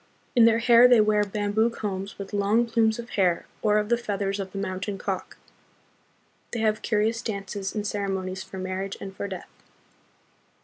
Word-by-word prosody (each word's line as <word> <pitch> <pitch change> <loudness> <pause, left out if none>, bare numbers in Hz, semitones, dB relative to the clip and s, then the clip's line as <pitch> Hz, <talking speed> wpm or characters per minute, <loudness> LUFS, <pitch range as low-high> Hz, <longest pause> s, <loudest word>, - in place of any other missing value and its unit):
In 235 -2 +7
their 230 0 +5
hair 235 +1 +7
they 245 -2 +6
wear 210 -1 +3
bamboo 205 +2 0
combs 200 -3 -5
with 200 +1 -8
long 205 +4 +2
plumes 225 -1 +2
of 235 0 -8
hair 180 -4 +1 0.2
or 210 -1 +3
of 210 0 0
the 235 - +3
feathers 200 -3 -2
of 190 -1 -4
the 200 - -7
mountain 190 +1 -3
cock. 190 -1 -4 1.2
They 240 - -1
have 215 0 +1
curious 225 +1 0
dances, 200 -2 -4
and 210 -1 -2
ceremonies 190 -2 -2
for 190 0 -9
marriage 185 +1 -4
and 195 -1 -8
for 200 - -4
death. 190 -3 -8
205 Hz, 175 wpm, -26 LUFS, 195-220 Hz, 1.2 s, In